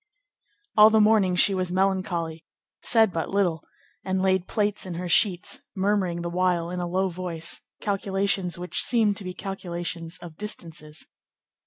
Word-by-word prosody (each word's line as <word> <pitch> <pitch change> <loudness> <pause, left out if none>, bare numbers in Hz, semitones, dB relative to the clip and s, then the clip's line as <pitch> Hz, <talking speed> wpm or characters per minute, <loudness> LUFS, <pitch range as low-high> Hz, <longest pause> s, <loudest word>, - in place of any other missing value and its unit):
All 210 0 +9
the 220 0 +4
morning 210 -4 +4
she 195 +2 +5
was 185 -2 -1
melancholy, 185 -4 -1 0.4
said 220 -5 +3
but 165 -1 -2
little, 180 -5 0 0.4
and 190 0 -1
laid 190 -1 +1
plaits 210 -1 0
in 175 - -5
her 180 +1 -4
sheets, 180 -1 +2 0.2
murmuring 190 -3 0
the 170 - -2
while, 175 -1 +1
in 180 - -3
a 175 - -2
low 190 +2 +1
voice, 170 -2 -4 0.2
calculations 195 -2 0
which 180 +1 -2
seemed 220 -4 +3
to - - -6
be 185 -1 -6
calculations 175 -3 -5
of 170 -3 -11
distances. 165 -7 -6
185 Hz, 155 wpm, -25 LUFS, 175-200 Hz, 0.4 s, All